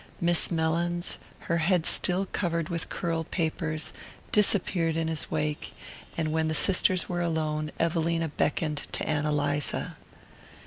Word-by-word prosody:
Miss 175 -1 +3
Mellins, 170 +1 0 0.2
her 170 - 0
head 170 0 +2
still 185 +2 +3
covered 170 -4 -2
with 170 -2 -2
curl 165 -1 -2
papers, 160 -1 -2 0.4
disappeared 180 -5 +3
in 165 -1 0
his 160 -1 -2
wake, 150 -1 -2 0.4
and 155 -2 0
when 160 0 +1
the 155 - 0
sisters 185 +1 +3
were 175 -1 -2
alone 155 -2 -1
Evelina 165 0 +1
beckoned 150 +1 0 0.2
to - - -1
Ann 150 -1 0
Eliza. 145 -1 -1
165 Hz, 135 wpm, -28 LUFS, 155-175 Hz, 0.4 s, Miss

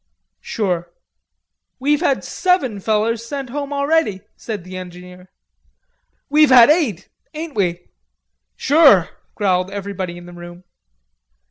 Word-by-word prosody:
"Sure." 175 -5 -3 0.9
"We've 290 +3 +1
had 280 -6 +1
seven 350 - 0
fellers 220 +3 0
sent 265 +1 -6
home 285 +1 -4
already," 280 -8 0
said 210 -6 -6
the 185 +1 -10
engineer. 180 0 -10 1.0
"We've 300 +1 +4
had 255 +1 +8
eight. 275 - 0 0.3
Ain't 315 0 -6
we?" 180 -5 -2 0.7
"Sure," 280 - +5 0.3
growled 185 -3 0
everybody 195 -3 -5
in 175 - -12
the 175 - -12
room. 175 +1 -11
210 Hz, 115 wpm, -19 LUFS, 180-280 Hz, 1.0 s, had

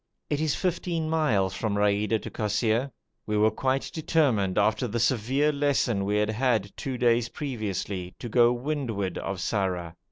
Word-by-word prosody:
It 145 0 0
is 155 -2 +1
fifteen 170 -3 -1
miles 110 - +2
from 105 0 -2
Raida 105 +2 +2
to - - -6
Kosseir. 110 +4 0 0.4
We 105 0 0
were 110 +1 +4
quite 130 +4 -1
determined, 130 - +1
after 110 +4 +2
the 120 +1 -2
severe 130 +5 +2
lesson 140 -8 +1
we 105 +1 0
had 105 +1 +1
had 110 -4 0
two 130 -2 -4
days 120 -1 +2
previously, 100 - -4
to 120 - -6
go 120 +1 +5
to 120 - +2
windward 120 -7 -2
of 95 - -4
Sarrar. 90 -3 -2
115 Hz, 165 wpm, -27 LUFS, 100-135 Hz, 0.4 s, go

